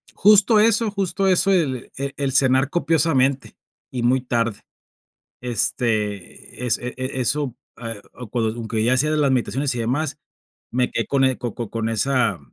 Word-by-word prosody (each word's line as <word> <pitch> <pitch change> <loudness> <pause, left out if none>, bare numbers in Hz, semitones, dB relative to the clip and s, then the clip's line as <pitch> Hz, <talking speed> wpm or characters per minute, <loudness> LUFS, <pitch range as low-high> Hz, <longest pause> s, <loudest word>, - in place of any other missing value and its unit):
Justo 210 +2 +5
eso 225 +1 +3
justo 195 -1 -1
eso 190 +1 +3
el 145 -10 0
e 140 +1 -3
el 140 -1 -1
cenar 130 0 +3
copiosamente 145 -5 +1 0.4
y 125 -2 -3
muy 125 +2 +2
tarde. 115 -4 -1 0.8
Este, 110 -3 -2
es 115 - +2
e 125 0 -6
e 130 0 -4
eso, 130 0 0 0.3
eh, 115 -3 -5
o 125 -3 -9
cuando 110 0 -1
aunque 115 -2 -3
ya 120 +3 +3
hacía 145 +4 +1
de 155 - +1
las 145 -2 +2
meditaciones 130 +2 0
y - - -4
demás, 140 +6 -2 0.5
me 125 +1 0
quedé 115 - -2
con 135 -1 +1
el 130 -1 +1
co 120 -4 -5
co 120 -4 -6
con 115 -1 -2
esa 115 -3 +1
130 Hz, 170 wpm, -21 LUFS, 115-145 Hz, 0.8 s, Justo